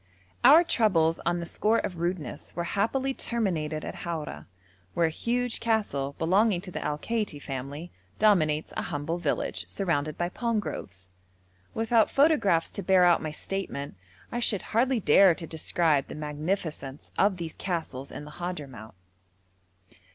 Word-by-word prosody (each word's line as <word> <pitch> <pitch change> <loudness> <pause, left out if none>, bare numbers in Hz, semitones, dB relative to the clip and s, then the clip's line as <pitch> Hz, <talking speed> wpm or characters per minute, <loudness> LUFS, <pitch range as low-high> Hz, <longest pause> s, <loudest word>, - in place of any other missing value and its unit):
Our 325 +4 +9
troubles 175 - +2
on 175 0 +1
the 170 - -4
score 215 +6 +1
of 180 -6 -3
rudeness 170 -2 -4
were 170 - -1
happily 230 +9 0
terminated 165 -12 -1
at - - -6
Haura, 165 -3 -5 0.5
where 170 - +3
a 160 - +1
huge 245 +7 -1
castle, 170 -12 0
belonging 190 +3 +3
to 180 - -7
the - - -4
Al 150 0 -1
Kaiti 210 -5 -2
family, 140 +5 -6 0.3
dominates 155 -8 +2
a - - -1
humble 150 +4 -3
village, 160 -5 -2
surrounded 155 -6 -1
by 175 0 -1
palm 230 +3 -1
groves. 95 - -7 0.7
Without 225 0 +3
photographs 275 - +3
to - - -4
bear 185 -1 +5
out 175 -1 +5
my 155 - -3
statement, 155 -3 -3 0.4
I 240 - -2
should 215 -5 +1
hardly 250 +2 +3
dare 180 0 +6
to 165 - -7
describe 160 -2 +1
the - - -8
magnificence 150 -2 -4
of 195 -1 +3
these 165 -2 -5
castles 160 -7 -4
in 150 - -8
the 150 - -10
Hadhramout. 145 - -7
175 Hz, 150 wpm, -27 LUFS, 150-210 Hz, 0.7 s, Our